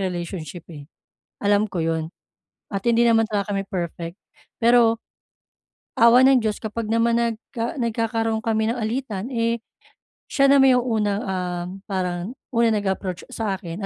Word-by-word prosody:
relationship, 175 -3 -4
eh. 145 -3 -10 0.5
Alam 205 +1 +2
ko 180 - -4
'yon 160 -1 -1 0.6
at 195 - -1
hindi 235 0 +4
naman 225 -1 +4
talaga 205 -1 -1
kami 195 - 0
perfect. 170 -1 -4 0.4
Pero 230 -1 +4 1.0
awa 235 +2 +7
ng 265 -1 +6
Diyos 215 -3 -2
kapag 220 +1 -4
naman 230 +1 +2
nagka 235 +1 -3
nagkakaroon 225 -2 -1
kami 220 0 0
ng 245 - -3
alitan, 225 -2 -3
eh, 230 0 +1 0.7
siya 275 0 +3
naman 270 -2 +6
'yong 250 - +3 0.2
unang, 205 -1 0
ah, 180 -2 -3 0.2
parang 185 +1 -3 0.2
unang 230 -2 +2
nag-approach 190 -2 -3
sa 215 -4 -2
akin 190 +1 -6
220 Hz, 145 wpm, -23 LUFS, 190-230 Hz, 1.0 s, awa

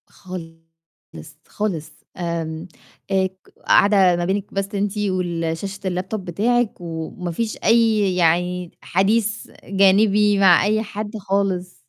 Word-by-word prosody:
خالص، 165 -3 -13
خالص 170 -7 -3 0.3
آمم، 165 -1 -4 0.4
آآ، 190 -1 +3
ك 190 0 -24 0.2
قاعدة 195 -3 +5
ما 175 0 -1
بينِك 195 +2 -2
بس 195 +1 -3
أنتِ 200 +1 -1
والشاشة 180 -1 -2
الlaptop 185 +3 -3
بتاعِك 215 +6 0
وما 170 +1 -5
فيش 220 +6 -3
أي 220 -4 +3
يعني 180 +1 +1
حديث 215 +4 0 0.2
جانبي 200 +1 +3
مع 180 -3 +6
أي 215 +1 +1
حد 210 0 -6
خالص. 195 -2 -1
190 Hz, 115 wpm, -21 LUFS, 175-205 Hz, 0.4 s, مع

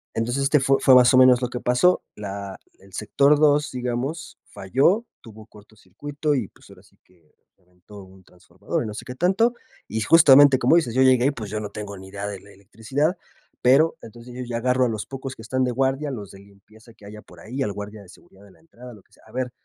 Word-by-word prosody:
Entonces 120 +4 -2
este 145 +2 +3
fu 135 +1 +2
fue, 130 - +5
más 125 0 +6
o - - +5
menos, 130 -1 +6
lo 125 - -2
que 125 - -5
pasó, 125 +9 +2
la 100 -1 -7 0.2
el 100 0 -20
sector 140 +9 +2
2, 145 -1 +2
digamos, 125 +6 -5
falló, 140 - 0 0.2
tuvo 110 -1 -14
corto 105 0 -19
circuito, 145 - -4
y 115 -7 -2
pues, - - -22
ahora - - -17
sí - - -27
que 85 -4 -31 0.2
reventó 90 +3 -16
un 95 0 -18
transformador 90 0 -6
y - - -5
no 105 - -7
sé 105 - -9
qué 125 - -8
tanto. 195 - +1 0.3
Y 110 +2 -4
justamente 140 0 +6
como 130 +7 +4
dices, 125 -9 -1
yo 130 - +3
llegué, 130 -1 +4
y - - +1
pues, 110 -7 -8
yo 105 - -3
no 105 - -6
tengo 100 -2 -8
ni 95 0 -12
idea 100 +1 -6
de 100 -2 -7
la 100 +2 -18
electricidad, 125 - -3 0.4
pero 140 +6 +3
entonces 120 +2 -13
yo 125 - -6
ya 120 -1 -4
agarro 125 +1 +1
a - - -1
los 110 -2 -5
pocos 135 -1 -8
que - - -13
están 130 +3 -1
de 125 - -1
guardia, 135 +3 -1
los 105 -6 -8
de 95 - -14
limpieza 100 +3 -20
que 105 - -19
haya 105 +1 -11
por 90 - -18
ahí, 125 +8 -6
al 100 - -3
guardia 105 +1 -9
de 95 - -17
seguridad 95 +2 -19
de 100 - -19
la - - -24
entrada, 125 -6 -14
lo 105 -4 -17
que - - -34
sea. - - -24
A - - -18
ver, 125 -1 -3
120 Hz, 240 wpm, -22 LUFS, 105-135 Hz, 0.4 s, más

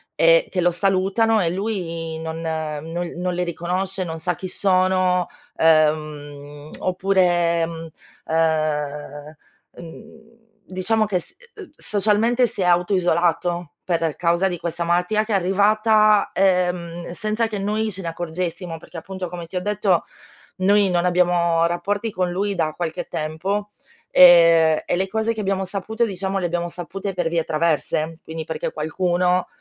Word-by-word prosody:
e - - +4
che 180 - 0
lo 175 - +3
salutano, 195 +4 +1
e 170 - +1
lui 170 -5 -4
non 160 0 -5
no 160 +1 -4
non 180 +1 -2
le 180 0 -1
riconosce, 180 +3 -3
non 160 -2 -6
sa 175 +1 -1
chi 185 - -6
sono, 185 -1 +1 0.3
ehm, 150 -2 0
oppure, 180 -3 +1
uhm 165 0 -8 0.4
ehm 150 -2 -1 0.4
uhm 220 +7 -12 0.4
diciamo 215 +4 0
che 195 -3 -1
s - - -15 0.4
socialmente 220 +4 +1
si 205 -3 -6
è - - +2
auto 180 +2 +2
isolato, 175 -2 0
per 165 -3 -1
causa 170 +2 +1
di 180 - -3
questa 170 0 -3
malattia 180 +5 +1
che 220 - -3
è - - +3
arrivata, 210 +2 +3
ehm, 180 -2 0
senza 215 +4 -1
che 215 - -5
noi 215 +2 -1
ce 190 - -6
ne - - -4
accorgessimo 170 0 -4
perché 165 +1 -12
appunto, 190 +1 -6
come 175 -1 -7
ti 185 - -12
ho 180 - -1
detto, 205 -3 +1 0.5
noi 200 +1 +3
non 175 0 +1
abbiamo 175 -2 +2
rapporti 200 +6 -2
con 180 -1 -1
lui 200 +2 -1
da 155 -3 -1
qualche 165 -2 -4
tempo, 190 +7 -3 0.4
e 165 -3 +7
e - - 0
le 190 +2 0
cose 220 +3 -1
che 220 - -8
abbiamo 195 -1 -1
saputo 210 +5 -2
diciamo 195 -1 -3
le 185 - -1
abbiamo 175 0 -2
sapute 180 +3 -6
per 175 -2 -1
vie 165 -1 0
traverse, 160 0 -1
quindi 160 0 -6
perché 160 -1 -4
qualcuno, 180 +3 0
180 Hz, 150 wpm, -22 LUFS, 165-195 Hz, 0.5 s, e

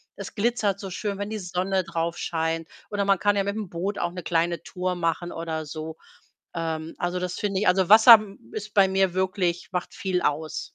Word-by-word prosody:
es - - -8
glitzert 210 -3 0
so 195 -2 -6
schön, 200 +1 -3
wenn 205 0 -4
die 215 -1 -4
Sonne 185 +1 -1
drauf 170 -1 -3
scheint. 165 0 -2 0.2
Oder 205 -1 -1
man 195 -2 +3
kann 205 0 +2
ja 200 - +2
mit'm 200 0 -3
Boot 185 +5 -3
auch 175 - -1
'ne 180 0 -7
kleine 170 -1 0
Tour 180 0 -3
machen, 175 0 -1
oder 160 -1 -4
so. 155 +1 -7 0.6
Ähm, 160 -1 -3
also, 175 +1 -1
das 180 0 -3
finde 200 -2 -1
ich 210 - +1
also, 180 -1 +3
Wasser 225 +2 +10 0.3
ist 210 +5 -6
bei 195 -2 +6
mir 190 -1 +1
wirklich 185 -2 -1
macht 180 -1 -4
viel 185 -2 -1
aus. 155 +2 -1
180 Hz, 200 wpm, -25 LUFS, 170-200 Hz, 0.6 s, Wasser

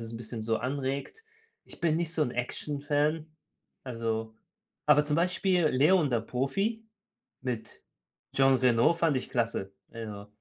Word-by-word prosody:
es 115 0 -7
'n - - -5
bisschen 115 -1 -6
so 110 0 +1
anregt. 140 - -3 0.4
ich - - -14
bin 160 -2 +2
nicht 165 -1 0
so 155 - +2
'n 125 - 0
Actionfan, 145 +5 -1 0.6
also 115 -2 -3 0.5
aber 150 - +6
zum 150 +1 +1
Beispiel 180 0 +2
„Léon– 150 +4 +4
Der 120 -2 +2
Profi“ 195 - -2 0.6
mit 125 -4 -5 0.5
Jean 135 0 +5
Reno 125 +3 +4
fand 165 -3 +2
ich 130 - -3
klasse, 115 -5 -1 0.2
also. 105 -3 -7
135 Hz, 145 wpm, -29 LUFS, 115-155 Hz, 0.6 s, aber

